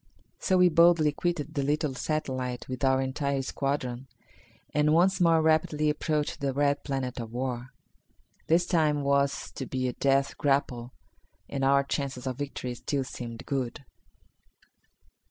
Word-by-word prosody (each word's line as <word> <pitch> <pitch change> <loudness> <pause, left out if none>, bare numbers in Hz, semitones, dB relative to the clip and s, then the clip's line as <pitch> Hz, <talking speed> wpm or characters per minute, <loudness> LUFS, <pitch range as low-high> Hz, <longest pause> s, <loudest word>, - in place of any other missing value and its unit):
So 185 - +2
we 180 0 +6
boldly 170 -2 +5
quitted 155 -1 -2
the 145 - 0
little 150 +1 0
satellite 130 -3 -3
with 130 +2 -5
our 130 0 +4
entire 135 +1 -1
squadron 135 -2 -3 0.7
and 150 +1 +3
once 185 +3 +3
more 165 -2 +4
rapidly 155 -1 +2
approached 150 0 -2
the 140 -1 -1
red 145 +1 +1
planet 135 -3 -3
of 115 -2 -6
war. 125 0 -3 0.8
This 170 +2 +3
time 155 -4 +2
it - - -2
was 140 0 +1
to 130 - -6
be 130 -1 -1
a 125 - -2
death 135 +1 +1
grapple 130 -4 0 0.6
and 140 -1 -3
our 140 +1 +4
chances 140 -2 -3
of 130 0 -3
victory 135 -3 -4
still 135 +3 -2
seemed 120 -1 -7
good. 135 0 -3
140 Hz, 150 wpm, -28 LUFS, 130-150 Hz, 0.8 s, we